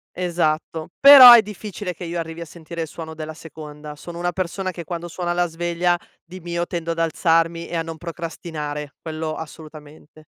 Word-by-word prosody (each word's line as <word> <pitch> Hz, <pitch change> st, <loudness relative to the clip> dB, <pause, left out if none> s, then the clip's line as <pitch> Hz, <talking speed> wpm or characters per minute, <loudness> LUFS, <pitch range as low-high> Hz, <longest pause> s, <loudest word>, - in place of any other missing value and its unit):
Esatto, 165 Hz, -3 st, -1 dB
però 270 Hz, -3 st, +11 dB
è 235 Hz, -, +8 dB
difficile 205 Hz, -2 st, -6 dB
che 175 Hz, -, -10 dB
io 170 Hz, 0 st, -4 dB
arrivi 165 Hz, 0 st, -5 dB
a -, -, -5 dB
sentire 165 Hz, +1 st, -8 dB
il 160 Hz, -, -3 dB
suono 160 Hz, 0 st, -8 dB
della 155 Hz, 0 st, -7 dB
seconda, 150 Hz, -2 st, -10 dB
sono 170 Hz, +3 st, -10 dB
una 175 Hz, 0 st, -1 dB
persona 185 Hz, +1 st, -3 dB
che 170 Hz, -1 st, -8 dB
quando 170 Hz, +1 st, -6 dB
suona 175 Hz, 0 st, -3 dB
la 175 Hz, 0 st, +1 dB
sveglia, 175 Hz, +1 st, 0 dB, 0.3 s
di 185 Hz, +2 st, -10 dB
mio 170 Hz, 0 st, -3 dB
tendo 170 Hz, -2 st, -4 dB
ad 165 Hz, -, -4 dB
alzarmi 165 Hz, 0 st, +1 dB
e -, -, -6 dB
a 165 Hz, -, 0 dB
non 165 Hz, -1 st, -7 dB
procrastinare, 155 Hz, -3 st, -6 dB
quello 155 Hz, -1 st, -4 dB
assolutamente. 155 Hz, -1 st, -12 dB
165 Hz, 185 wpm, -22 LUFS, 160-175 Hz, 0.3 s, però